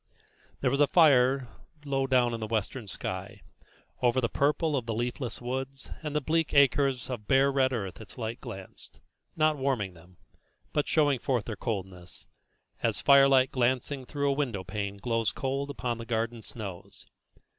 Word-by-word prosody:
There 130 - +2
was 140 - +1
a 145 - +6
fire 135 -5 +5 0.4
low 135 -1 0
down 125 -3 +3
in 115 - -3
the 110 - -3
western 110 +1 -2
sky; - - -5 0.6
over 125 +1 +3
the 120 - +1
purple 150 +2 +1
of 125 -4 -2
the 115 - -1
leafless 120 +2 -2
woods 130 +2 -5
and 150 -2 -4
the - - +4
bleak 160 +2 0
acres 140 -2 +4
of 120 -5 -6
bare 135 +1 +4
red 135 -1 +2
earth 100 -6 -4
its 110 - -12
light 115 0 -4
glanced, 95 -7 -8 0.4
not 155 -1 +3
warming 130 -9 -1
them, 90 +1 -18 0.6
but 150 - +1
showing 145 -4 +3
forth 120 -3 0
their 110 - -4
coldness, 95 -5 -5 0.6
as - - 0
firelight 135 -2 +6
glancing 130 +2 0
through 145 -1 0
a - - 0
window 120 -10 -1
pane 100 +1 -4
glows 115 0 0
cold 135 +1 -2
upon 125 -4 -3
the 115 - -6
garden 115 0 -1
snows. 100 -5 -9
130 Hz, 165 wpm, -29 LUFS, 115-140 Hz, 0.6 s, a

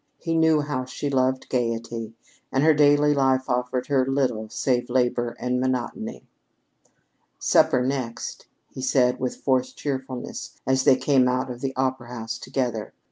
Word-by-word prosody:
He 165 - -3
knew 160 -2 +4
how 145 -3 -3
she 140 +2 -4
loved 130 0 +1
gayety; 115 -2 -2 0.4
and 135 - +2
her 160 0 +6
daily 145 0 +4
life 130 -2 +2
offered 125 0 -1
her 135 -2 +2
little 130 -5 -1
save 125 0 0
labor 120 -1 0
and 125 0 0
monotony. 130 -1 -3 1.1
"Supper 125 0 +3
next," 130 -3 -4 0.2
he 130 - -7
said 125 -1 +2
with 130 -1 -2
forced 130 -1 0
cheerfulness 130 -3 -5
as 130 0 +2
they 135 - +7
came 130 -1 +3
out 130 +1 0
of 120 0 -8
the 135 -1 -3
opera 130 -2 -1
house 115 -2 -5
together. 120 -5 -3
130 Hz, 150 wpm, -24 LUFS, 125-135 Hz, 1.1 s, they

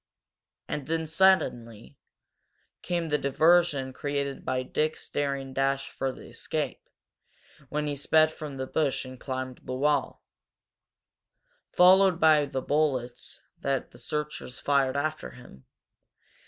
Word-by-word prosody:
And 145 - -4
then, 165 0 0
quite 160 - -7
suddenly, 120 - +1 0.9
came 170 -2 -2
the 150 0 +1
diversion 145 -1 +3
created 140 0 -3
by 130 0 -1
Dick's 155 +4 -2
daring 140 -2 -2
dash 135 +1 0
for 135 - -3
escape, 130 - -5 0.8
when 150 0 -2
he 145 -1 -2
sped 155 +3 +3
from 150 -3 -8
the 130 0 -3
bush 140 -1 -1
and 130 -1 -10
climbed 130 -1 -5
the 130 - -5
wall, 145 0 0 1.5
followed 185 0 +5
by 155 -3 +5
the 135 -2 -4
bullets 135 -5 -1 0.2
that 135 -1 -2
the - - -16
searchers 150 -4 -5
fired 140 -1 +1
after 155 +2 -2
him. 65 - -15
140 Hz, 125 wpm, -27 LUFS, 130-155 Hz, 1.5 s, followed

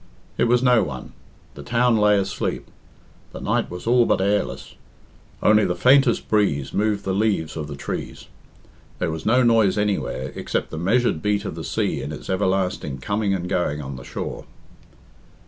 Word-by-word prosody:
It - - +2
was 120 +1 +3
no 125 -3 +5
one; 70 -9 -6 0.4
the - - -10
town 120 +7 +2
lay 105 -1 +4
asleep; 95 -1 -2 0.7
the - - -7
night - - -1
was 90 0 -8
all 120 0 +4
but - - +2
airless; 100 +2 -1 0.7
only 105 0 +5
the 90 - 0
faintest 130 -2 +4
breeze 100 -11 +1
moved 105 -1 0
the 95 - 0
leaves 100 -6 0
of 75 -2 -4
the 70 - -6
trees; - - -6 0.7
there 80 - -1
was 80 +3 -5
no 125 +3 +4
noise 115 -4 +3
anywhere, 95 -10 -1
except - - -3
the 80 - -5
measured 105 -1 +1
beat 105 +1 0
of - - -4
the 80 0 -7
sea - - -1
in 75 - -5
its 75 - -6
everlasting 95 -7 -1
coming 100 +8 -1
and 90 -1 -4
going 80 -5 -1
on 70 -2 -6
the 60 - -9
shore. - - -6
100 Hz, 175 wpm, -22 LUFS, 80-110 Hz, 0.7 s, no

